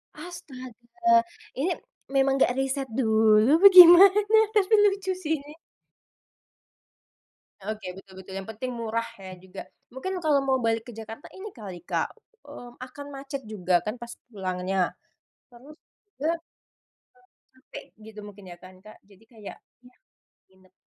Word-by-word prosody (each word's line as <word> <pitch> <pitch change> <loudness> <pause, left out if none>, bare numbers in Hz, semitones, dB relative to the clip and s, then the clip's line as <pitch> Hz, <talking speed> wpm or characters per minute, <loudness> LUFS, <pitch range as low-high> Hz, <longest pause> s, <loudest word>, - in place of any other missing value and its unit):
Astaga 345 +1 -2 0.3
ini, 310 +8 -1 0.4
memang 270 0 +2
gak 245 - 0
riset 270 0 -2
dulu 220 +1 +3
apa 390 +5 +8
gimana? 365 +2 +9 0.4
Tapi 415 +1 +2
lucu 390 -1 -2
sih 320 -4 -3
ini. 295 +2 -13 2.1
Oke 215 +1 -6
betul 195 0 -15
betul 190 0 -12
yang 195 - -7
penting 250 +4 -6
murah 230 -1 -3 0.2
ya 190 -1 -9
juga 190 +1 -10 0.3
mungkin 320 +9 -5
kalau 300 -3 +3
mau 265 -1 +1
balik 225 0 0
ke - - -8
Jakarta 225 +4 -10
ini 405 +2 -9
kali 200 -7 -9
Kak, - - -2 0.4
mmm, 245 0 -12
akan 260 +3 -9
macet 275 0 -7
juga 185 -4 -1
kan 215 +3 -3
pas 235 0 -8 0.2
pulangnya, 185 -1 -2 0.6
terus 255 +5 -16
juga, - - -25 0.4
terlalu 330 +3 0 1.2
capek 260 - -12 0.2
gitu 215 0 -12
mungkin 205 -1 -14
ya 175 - -11
kan 185 0 -15
Kak, 215 0 -15
jadi 200 +1 -22
kayak 215 -3 -11 0.3
ya 250 - -20 0.6
nginep. 190 0 -26
245 Hz, 140 wpm, -25 LUFS, 215-300 Hz, 2.1 s, gimana